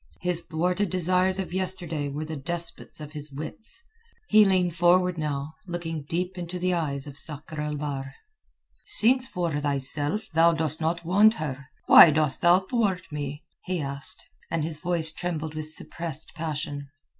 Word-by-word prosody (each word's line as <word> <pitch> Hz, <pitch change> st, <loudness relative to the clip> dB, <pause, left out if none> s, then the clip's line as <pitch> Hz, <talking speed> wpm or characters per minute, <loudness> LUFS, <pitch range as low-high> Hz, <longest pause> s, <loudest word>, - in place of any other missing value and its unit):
His 180 Hz, -1 st, +1 dB
thwarted 180 Hz, +5 st, 0 dB
desires 185 Hz, +1 st, +2 dB
of 190 Hz, -2 st, -4 dB
yesterday 175 Hz, -6 st, -1 dB
were 150 Hz, +3 st, -4 dB
the 160 Hz, 0 st, -5 dB
despots 170 Hz, +4 st, -4 dB
of 150 Hz, -1 st, -8 dB
his 150 Hz, -1 st, -6 dB
wits. 160 Hz, -, -5 dB, 0.5 s
He 215 Hz, 0 st, +7 dB
leaned 185 Hz, -3 st, +2 dB
forward 180 Hz, +1 st, +3 dB
now, 150 Hz, -1 st, -3 dB
looking 165 Hz, -4 st, -4 dB
deep 180 Hz, +2 st, -2 dB
into 175 Hz, +1 st, -5 dB
the 180 Hz, 0 st, 0 dB
eyes 140 Hz, -5 st, -1 dB
of 145 Hz, 0 st, -6 dB
Sakr 150 Hz, 0 st, -3 dB
el 150 Hz, 0 st, -3 dB
Bahr. 140 Hz, -2 st, -5 dB, 0.7 s
"Since 255 Hz, -, +3 dB
for 170 Hz, -, -2 dB
thyself 145 Hz, +6 st, +1 dB
thou 165 Hz, +1 st, +5 dB
dost 160 Hz, -1 st, -1 dB
not 170 Hz, +1 st, -1 dB
want 205 Hz, +6 st, +5 dB
her, 140 Hz, -, -5 dB, 0.2 s
why -, -, +10 dB
dost 155 Hz, -3 st, +1 dB
thou 175 Hz, +1 st, +6 dB
thwart 190 Hz, -3 st, -1 dB
me?" 145 Hz, 0 st, -5 dB, 0.2 s
he 185 Hz, -1 st, -2 dB
asked, 140 Hz, -1 st, -3 dB, 0.2 s
and 165 Hz, -2 st, -1 dB
his 155 Hz, -1 st, -2 dB
voice 170 Hz, -2 st, +1 dB
trembled 160 Hz, -2 st, -4 dB
with 155 Hz, 0 st, -4 dB
suppressed 155 Hz, -1 st, -5 dB
passion. 150 Hz, -3 st, -4 dB
165 Hz, 160 wpm, -26 LUFS, 150-180 Hz, 0.7 s, why